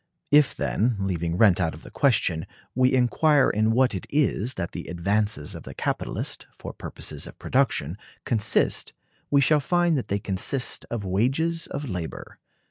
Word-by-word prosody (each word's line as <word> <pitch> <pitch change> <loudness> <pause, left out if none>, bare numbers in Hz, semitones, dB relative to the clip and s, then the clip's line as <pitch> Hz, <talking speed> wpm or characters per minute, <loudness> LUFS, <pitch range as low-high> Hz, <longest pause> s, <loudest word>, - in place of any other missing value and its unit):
If, 145 -1 +5
then, 115 +3 0
leaving 85 -3 -2
rent 100 -3 +5
out 80 -3 0
of 80 - -14
the - - -12
question, 95 - +1 0.3
we 130 +1 +3
inquire 135 +3 +3
in 110 +1 +1
what 125 +2 +3
it 95 - -5
is 130 -4 +1
that 85 -2 -4
the 85 - -7
advances 100 -1 0
of - - -8
the - - -10
capitalist, - - -3
for - - -8
purposes - - -4
of - - -12
production, 110 - 0 0.3
consist, 110 -3 +1 0.4
we 140 -1 +4
shall 150 +2 +4
find 175 +3 +2
that - - -6
they 100 - 0
consist 105 +7 -1
of 115 -4 -4
wages 135 - 0
of 145 0 -5
labor. 90 -6 -6
110 Hz, 165 wpm, -25 LUFS, 95-140 Hz, 0.4 s, If